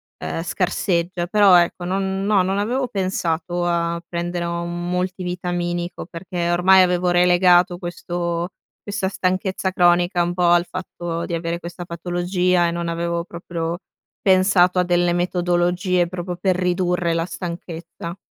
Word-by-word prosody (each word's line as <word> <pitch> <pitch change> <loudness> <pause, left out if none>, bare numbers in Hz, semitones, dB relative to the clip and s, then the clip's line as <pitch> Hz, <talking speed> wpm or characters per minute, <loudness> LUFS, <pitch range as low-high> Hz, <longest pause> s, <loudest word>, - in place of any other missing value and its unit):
ehm, - - -4
scarseggia, 175 -1 -1
però 200 0 +6
ecco 175 +1 +1
non 190 +1 -1
no, 205 -2 +3
non 190 +2 0
avevo 250 +6 0
pensato 175 -4 -2
a 170 -1 0
prendere 175 0 -3
un 170 0 -3
multivitaminico 180 -1 -3
perché, 175 0 -3
ormai, 185 +2 +6
avevo 180 0 +1
relegato 175 0 +4
questo 175 0 -3 0.3
questa 200 -2 -2
stanchezza 190 0 -1
cronica 175 0 +3
un 175 +1 -2
po' 180 0 +1
al 175 0 +5
fatto 175 -2 -5
di - - -5
avere 170 0 -2
questa 175 +1 -7
patologia 175 +1 0
e - - -1
non 170 0 -3
avevo 170 0 -2
proprio 170 -1 -5 0.4
pensato 185 -1 +4
a - - +4
delle 175 0 +2
metodologie 175 +1 +1
proprio 180 0 -5
per 185 0 +1
ridurre 180 -1 0
la 165 0 0
stanchezza. 170 -1 -7
175 Hz, 140 wpm, -21 LUFS, 170-185 Hz, 0.4 s, però